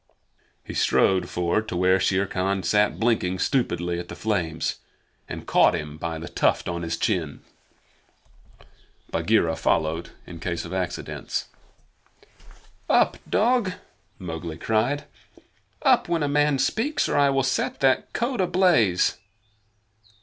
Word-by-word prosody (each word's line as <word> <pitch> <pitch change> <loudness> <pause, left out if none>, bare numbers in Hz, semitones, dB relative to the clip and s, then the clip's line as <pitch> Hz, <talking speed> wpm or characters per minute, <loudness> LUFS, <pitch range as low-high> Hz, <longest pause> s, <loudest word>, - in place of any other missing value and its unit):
He - - -8
strode 95 -1 +2
forward 90 +5 0
to 90 - -3
where 95 +1 +3
Shere 95 +1 +1
Khan 95 0 -1
sat 105 0 +2
blinking 110 -6 +1
stupidly 85 - 0
at 85 - -7
the - - -8
flames, 85 -7 -2 0.5
and - - -6
caught - - +4
him 75 -2 -6
by 80 -1 -3
the 80 +2 -7
tuft - - +1
on 85 -1 -3
his 85 0 -3
chin. 85 -9 -1 1.7
Bagheera 85 -1 +2
followed 80 +1 0 0.2
in 85 -2 -10
case 85 0 -3
of - - -7
accidents. 90 -1 -4 1.4
"Up, - - +3
dog!" 225 -3 +2 0.4
Mowgli 80 -3 -6
cried. 115 +9 0 0.8
"Up, 260 - +3
when 165 -3 +1
a - - +1
man 145 0 +2
speaks, 240 - 0
or - - -1
I 140 -1 +4
will 135 -1 +1
set 130 -1 -1
that 135 -1 +2
coat 240 -2 -1
ablaze!" 175 - +3
95 Hz, 130 wpm, -24 LUFS, 85-140 Hz, 1.7 s, caught